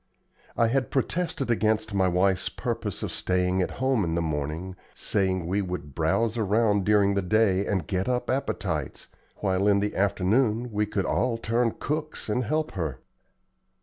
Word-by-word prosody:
I 115 - +4
had 130 +1 0
protested 140 -1 -1
against 110 -1 +1
my 95 -2 +3
wife's 90 +1 +2
purpose - - -4
of - - -3
staying 90 0 +1
at - - 0
home 130 -4 +2
in 80 -2 -1
the 85 - +1
morning, 80 +4 -3 0.2
saying 95 -3 0
we 95 +4 0
would 90 -7 -5
"browse 110 - +1
around 105 -1 +2
during 100 -1 +4
the 100 - +1
day 100 0 +2
and 95 -4 0
get 95 +4 -1
up 125 -1 0
appetites, 100 - -2 0.3
while 95 0 +1
in 100 -1 +4
the 105 +1 -2
afternoon 105 +5 +1
we 105 0 0
could 100 -2 -1
all 115 -2 +1
turn 115 0 0
cooks 155 -4 -3
and 120 +3 0
help 155 +4 -1
her." 80 - -3
100 Hz, 165 wpm, -26 LUFS, 95-115 Hz, 0.3 s, I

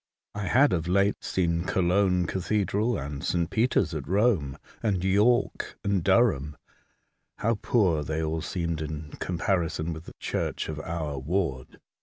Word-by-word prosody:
I 105 -2 -4
had 135 +8 +4
of 85 -1 -1
late 100 +3 +2
seen 85 -2 0
Cologne 90 -1 +2
Cathedral 100 +5 0
and 70 +1 -5
St. 85 -1 0
Peter's 110 -7 +2
at 75 -4 -4
Rome, 95 - +2 0.2
and 100 -6 0
York 105 +6 +2
and 100 -3 +1
Durham. 95 - +2 0.8
How 115 -1 0
poor 90 -10 +2
they 80 +2 -2
all 80 +1 -1
seemed 85 -2 -2
in 75 -1 -5
comparison 85 -2 -1
with 80 +1 -9
the - - -11
church - - -2
of 75 -1 -4
our 80 -3 -4
ward 70 -3 -2
90 Hz, 145 wpm, -27 LUFS, 80-100 Hz, 0.8 s, had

